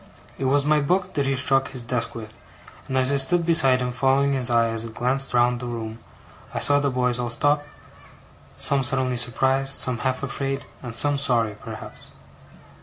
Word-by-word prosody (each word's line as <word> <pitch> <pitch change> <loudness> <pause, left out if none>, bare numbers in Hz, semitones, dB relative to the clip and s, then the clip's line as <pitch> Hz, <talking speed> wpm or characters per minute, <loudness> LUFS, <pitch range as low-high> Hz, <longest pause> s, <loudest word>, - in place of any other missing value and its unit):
It 135 - -2
was 140 +2 +3
my 150 0 +3
book 180 +6 0
that 140 -2 0
he 135 - +1
struck 135 0 +4
his 130 -3 -8
desk 120 0 -3
with; 110 -1 -8 0.5
and 130 - -2
as 130 +1 +2
I 140 - +2
stood 170 +5 +1
beside 135 -6 +5
him, 125 - -2
following 135 +2 +2
his 130 -2 0
eye 115 -1 +3
as 115 0 -2
it 115 -1 -9
glanced 135 +2 -1
round 120 0 +3
the 125 - -6
room, 115 -1 -6 0.6
I - - -1
saw 145 0 +3
the 140 0 0
boys 125 -1 0
all 120 -1 -2
stop, 145 +5 +1 0.9
some 140 -1 +2
suddenly 130 -1 0
surprised, 135 +3 +1
some 125 -2 -1
half 130 +1 -2
afraid, 135 0 -3 0.2
and 120 -3 -8
some 145 +2 0
sorry 120 -6 +1
perhaps. 105 - -10
130 Hz, 190 wpm, -23 LUFS, 120-140 Hz, 0.9 s, beside